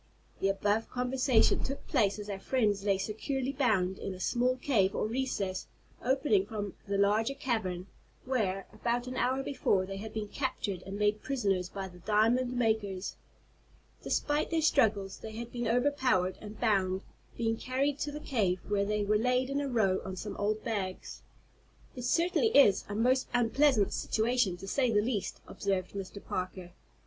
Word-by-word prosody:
The 195 - +2
above 205 +3 0
conversation 250 -1 +2
took 275 +1 -4
place 200 -1 +2
as 210 -1 -7
our 200 -2 -4
friends 210 -5 +1
lay 200 -1 +2
securely 250 +7 -2
bound 215 -9 +1
in 195 - -4
a - - -11
small 250 +6 +1
cave, 215 -8 +2
or - - 0
recess, 215 -6 -2 0.4
opening 250 -7 +2
from 205 -3 -4
the 200 0 0
larger 215 +6 +2
cavern, 205 -10 -2 0.4
where, 200 -7 0
about 240 +1 -1
an 255 0 -5
hour 260 +2 +1
before, 210 -9 +1
they 195 +1 -6
had 215 +2 -6
been 215 -1 -4
captured 210 -7 -3
and 195 +1 -5
made 210 0 +1
prisoners 195 -9 0
by 195 0 -5
the 180 -1 -14
diamond 225 +6 +2
makers. 215 -5 0 0.9
Despite 295 +1 0
their 325 -1 +1
struggles 215 -10 +2
they 220 - -8
had 235 +2 -6
been 240 -1 -2
overpowered 245 -7 +2
and 210 0 -9
bound, 190 -2 +1 0.3
being 225 -1 +1
carried 270 +4 -1
to 290 - -2
the 300 - -6
cave, 205 -11 0
where 200 -1 +1
they 210 0 0
were 210 +1 +2
laid 250 +3 +1
in 280 +1 0
a 285 - -2
row 200 -6 +2
on 190 0 -5
some 205 +3 -5
old 215 +1 -1
bags. 195 -5 -4 0.7
"It 250 -1 -5
certainly 345 - +2
is 205 -9 +6
a 205 - -3
most 255 +4 +2
unpleasant 245 -1 +3
situation, 220 -4 +1
to 195 - -9
say 255 +4 +1
the 210 -2 +3
least," 210 -2 -2
observed 190 -2 -2
Mr. 200 0 -7
Parker. 185 -1 -4
215 Hz, 170 wpm, -31 LUFS, 195-255 Hz, 0.9 s, is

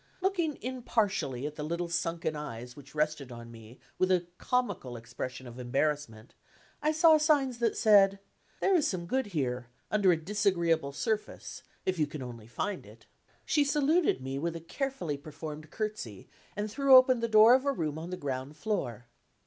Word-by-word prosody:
Looking 360 -5 0
impartially 205 - -1
at 150 0 -5
the 150 - -4
little 170 +3 -2
sunken 165 -1 -2
eyes 125 -4 -7
which 140 +1 -14
rested 150 -3 -1
on 115 -1 -9
me 115 +2 -13 0.2
with 185 0 +3
a 180 -1 +2
comical 200 - -1
expression 125 +3 -6
of 120 0 -10
embarrassment, 125 -3 -2 0.5
I 305 +1 +2
saw 315 0 +6
signs 280 -5 +2
that 230 -2 +1
said: 200 -2 +6 0.4
There 390 - +3
is 340 -6 +3
some 175 -3 -3
good 260 +6 -1
here, 130 -9 -2 0.2
under 200 -3 +4
a 170 - +3
disagreeable 170 -5 +1
surface, 215 - -3 0.2
if 185 -2 -1
you 150 - +2
can 145 -2 -7
only 115 -3 -9
find 190 - -3
it. - - -16 0.4
She 295 - +3
saluted 295 - +2
me 135 +1 -3
with 170 +2 -2
a - - -4
carefully 175 - -3
performed 155 +1 -8
curtsey, 210 - -5 0.3
and 210 +1 -3
threw 275 +2 +6
open 255 -1 +7
the 230 - 0
door 220 +2 +8
of 260 +1 +4
a 280 - +2
room 160 - -3
on 165 +2 -7
the 180 - -4
ground 135 0 -4
floor. 125 - -3
170 Hz, 175 wpm, -30 LUFS, 140-230 Hz, 0.5 s, door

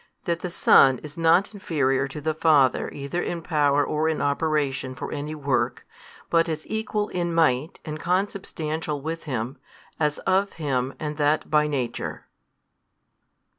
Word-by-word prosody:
That 170 -1 0
the 180 - -4
Son 135 -6 +5
is 150 0 -9
not 170 +5 +3
inferior 135 -9 0
to 140 - -7
the 155 +2 -1
Father 150 -4 +3
either 140 +5 -4
in 170 -1 -3
power 145 -3 +2
or 155 +1 0
in 160 - -1
operation 140 -3 0
for - - -6
any 150 +1 -4
work 140 -3 -1 0.5
but 165 0 +3
is 155 -1 -4
Equal 215 -1 -2
in 175 -1 -2
Might 155 -2 +2
and 155 0 -5
Consubstantial 165 -4 -2
with 160 +4 -5
Him, 130 -1 -3 0.4
as 150 -1 +1
of 195 +1 +2
Him 135 -4 -2
and 150 -1 -4
that 150 +1 +1
by 150 0 +4
Nature. 135 -5 -3
150 Hz, 150 wpm, -25 LUFS, 140-165 Hz, 0.5 s, Son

